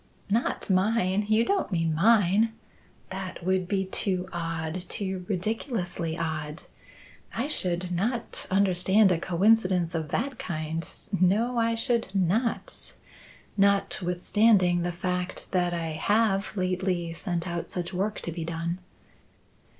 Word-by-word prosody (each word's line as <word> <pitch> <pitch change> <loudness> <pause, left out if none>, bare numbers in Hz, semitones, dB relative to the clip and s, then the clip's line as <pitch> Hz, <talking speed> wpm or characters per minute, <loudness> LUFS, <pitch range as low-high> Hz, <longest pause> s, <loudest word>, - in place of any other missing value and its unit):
"Not 230 +3 0
mine? 195 +1 +2
You 220 +2 +4
don't 400 - 0
mean 165 -3 +1
mine? 210 +4 +4 0.6
That 185 -2 -6
would 185 -1 +1
be 190 0 0
too 185 -1 -1
odd 165 0 -3
too 190 -2 -3
ridiculously 185 - -2
odd. 155 -1 -3 0.7
I 245 +5 -1
should 180 - 0
not 230 +7 -1
understand 190 +1 +4
a 170 - +2
coincidence 185 -1 +2
of 160 -3 -2
that 260 - -2
kind; 160 -1 -3 0.3
no, 225 +7 +3
I 230 0 +2
should 230 -4 0
not, 200 +6 -1 0.6
notwithstanding 195 -1 +3
the 175 +1 -1
fact 180 0 -3
that 180 -1 +1
I 170 -1 -2
have 200 +4 +1
lately 185 -2 -1
sent 175 0 -3
out 170 -1 -4
such 175 -1 -4
work 200 +4 -1
to 170 - -4
be 165 0 -4
done." 170 +2 -3
185 Hz, 125 wpm, -27 LUFS, 175-210 Hz, 0.7 s, You